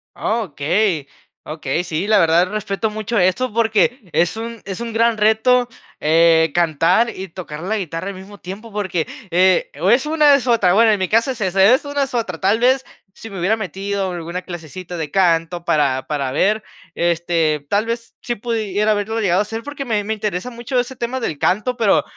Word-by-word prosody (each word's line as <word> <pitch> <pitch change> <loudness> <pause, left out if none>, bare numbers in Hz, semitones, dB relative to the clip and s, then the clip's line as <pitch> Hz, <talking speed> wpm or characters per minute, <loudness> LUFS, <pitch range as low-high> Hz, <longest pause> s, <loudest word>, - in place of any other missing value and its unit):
Okey, 180 -5 -1 0.4
okey. 155 +3 -3
Sí 175 +3 -3
la 215 - +4
verdad 170 +2 +4
respeto 210 0 -2
mucho 215 +2 -3
eso 205 +7 +1
porque 225 -1 +1
es 175 +5 +1
un 230 0 -6
es 195 -2 -5
un 235 - -4
gran 230 0 +2
reto, 220 +4 +3 0.3
eh, 160 0 +4
cantar 170 +7 +2
y 190 - -6
tocar 160 -3 -8
la 215 +5 -1
guitarra 170 -1 -4
al 200 - -5
mismo 195 +2 -12
tiempo 205 +5 -9
porque, 185 -5 -2 0.3
eh, 185 - +3
o - - +1
es 260 +4 +3
una 300 -1 +4
o - - +7
es 260 -2 -2
otra, 200 -7 +3
bueno, 225 +1 +5
en 210 - +1
mi 185 - 0
caso 230 +4 +2
es 240 - -7
esa, 190 0 +2
es 250 +8 +5
una 285 0 -2
o - - +4
es 270 - -6
otra, 205 -9 -2
tal 200 +4 +2
vez 260 +2 +3 0.3
si 225 - -10
me 195 -3 -7
hubiera 195 +6 +2
metido 195 0 -3
alguna 175 +1 -5
clasecita 175 0 -8
de 155 -3 -4
canto 170 -2 +1
para 135 -5 +1
para 140 -3 -2
ver, 210 +9 +1 0.3
este, 165 -3 0
tal 205 +2 +1
vez 230 0 -5
sí 240 -1 -3
pudiera 215 -2 -1
haberlo 215 +2 -1
llegado 185 -2 +2
a - - +4
hacer, 225 +2 -6
porque 285 0 -6
me 215 -3 0
me 220 +2 -2
interesa 210 +1 -3
mucho 240 +2 -2
ese 250 +2 -3
tema 240 +2 -3
del 155 - -3
canto, 215 - 0
pero 220 -5 +3
200 Hz, 205 wpm, -19 LUFS, 175-230 Hz, 0.4 s, o